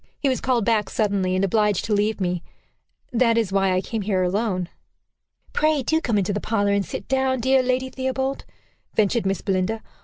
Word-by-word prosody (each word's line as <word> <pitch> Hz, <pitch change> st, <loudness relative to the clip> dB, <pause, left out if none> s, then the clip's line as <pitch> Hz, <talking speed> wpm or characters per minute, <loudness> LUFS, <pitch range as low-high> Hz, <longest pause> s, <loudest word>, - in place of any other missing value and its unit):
He 285 Hz, -, 0 dB
was 260 Hz, -, -1 dB
called 245 Hz, -5 st, +1 dB
back 220 Hz, -3 st, +1 dB
suddenly, 195 Hz, -4 st, 0 dB
and 190 Hz, +1 st, +2 dB
obliged 210 Hz, -1 st, +1 dB
to 220 Hz, -, 0 dB
leave 210 Hz, +1 st, +1 dB
me. 180 Hz, -2 st, -1 dB, 0.7 s
That 230 Hz, -1 st, +3 dB
is 220 Hz, -4 st, +1 dB
why 195 Hz, -1 st, +2 dB
I 185 Hz, 0 st, +1 dB
came 220 Hz, +3 st, -4 dB
here 190 Hz, -2 st, 0 dB
alone." 185 Hz, -1 st, 0 dB, 0.9 s
"Pray 305 Hz, -3 st, +2 dB
do 320 Hz, +6 st, +1 dB
come 230 Hz, -9 st, 0 dB
into 200 Hz, 0 st, 0 dB
the 205 Hz, -, -2 dB
parlor, 205 Hz, -2 st, +1 dB
and 200 Hz, 0 st, +2 dB
sit -, -, -7 dB
down, 265 Hz, -1 st, +1 dB
dear 260 Hz, +2 st, +3 dB
Lady 255 Hz, +1 st, 0 dB
Theobald," 265 Hz, +1 st, -2 dB, 0.5 s
ventured 215 Hz, 0 st, +2 dB
Miss 195 Hz, 0 st, -1 dB
Belinda. 195 Hz, +3 st, -1 dB
215 Hz, 190 wpm, -23 LUFS, 195-255 Hz, 0.9 s, That